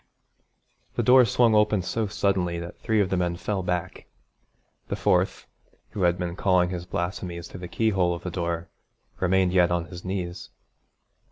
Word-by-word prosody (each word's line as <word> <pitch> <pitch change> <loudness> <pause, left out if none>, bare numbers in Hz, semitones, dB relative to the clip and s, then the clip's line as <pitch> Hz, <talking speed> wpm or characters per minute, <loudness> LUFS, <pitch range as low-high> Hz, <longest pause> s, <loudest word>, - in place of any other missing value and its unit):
The - - 0
door 125 0 +7
swung 115 0 +3
open 105 -2 +3
so 110 +3 -1
suddenly 95 -4 0
that 85 0 -8
three 110 -2 +1
of 95 - -1
the 95 - +1
men 90 -1 0
fell 95 +2 -2
back. 90 0 -3 0.8
The - - -2
fourth, 90 +1 +1 0.5
who 100 - -5
had 90 -1 +3
been 90 -1 -3
calling 90 -2 +2
his 90 -1 -5
blasphemies 85 -1 -4
through - - -10
the 90 - -6
keyhole 95 -5 +1
of 85 - -9
the 90 - -4
door, 85 -1 -3 0.5
remained 95 0 +2
yet 90 -2 +4
on 85 -1 0
his 90 0 -10
knees. 90 -1 -4
90 Hz, 170 wpm, -25 LUFS, 85-95 Hz, 0.8 s, door